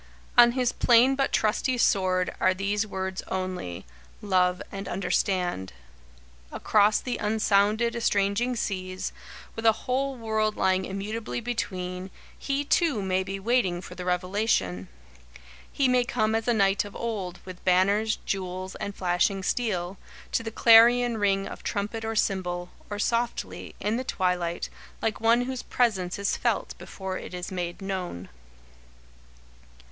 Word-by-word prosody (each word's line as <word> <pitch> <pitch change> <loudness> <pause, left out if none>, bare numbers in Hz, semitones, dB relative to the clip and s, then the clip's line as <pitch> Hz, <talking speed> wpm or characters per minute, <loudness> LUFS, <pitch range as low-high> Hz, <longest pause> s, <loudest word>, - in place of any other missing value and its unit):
"On 240 0 +7
his 250 -1 +1
plain 245 +2 +5
but 270 0 0
trusty 235 +4 +1
sword 185 -5 +2
are 185 0 +3
these 205 +3 -1
words 190 -1 -4
only 185 - -4 0.3
Love 185 -3 +2
and 195 -1 -6
Understand." 180 - -1 0.8
Across 210 0 +3
the 250 - -3
unsounded, 215 +2 +2
estranging 225 +2 +1
seas, 185 -4 -3 0.4
with 225 - -5
a 225 - +7
whole 270 +2 0
world 220 -2 -1
lying 190 0 +2
immutably 210 +5 -4
between, 185 -6 -4 0.3
he, 280 +1 -2
too, 290 - +2
may 190 0 +1
be 195 +1 -4
waiting 195 -5 +1
for 180 - -9
the 180 0 -7
revelation. 180 - 0 0.8
He 275 - +2
may 250 -1 +3
come 220 -3 0
as 225 +1 -1
a 240 - +4
knight 195 -2 +3
of 205 -1 -10
old, 200 -6 -4
with 185 -1 -10
banners, 200 +4 +3
jewels, 185 -1 -3
and 200 - -5
flashing 185 +2 +1
steel, 190 -4 -1 0.3
to - - +1
the 225 - -4
clarion 235 +1 +6
ring 195 -1 +1
of - - -8
trumpet 210 +3 -3
or 225 0 -3
cymbal, 180 -4 -1 0.2
or 205 - -4
softly, 235 +3 -2
in 215 +3 0
the 255 - -2
twilight, 180 -6 -1 0.3
like 220 -1 -2
one 230 +2 +4
whose 255 0 -3
presence 195 -7 0
is 200 0 0
felt - - -1
before 190 -1 -6
it - - -8
is 180 +1 -5
made 180 +1 -4
known. 180 - -4
200 Hz, 140 wpm, -27 LUFS, 185-230 Hz, 0.8 s, On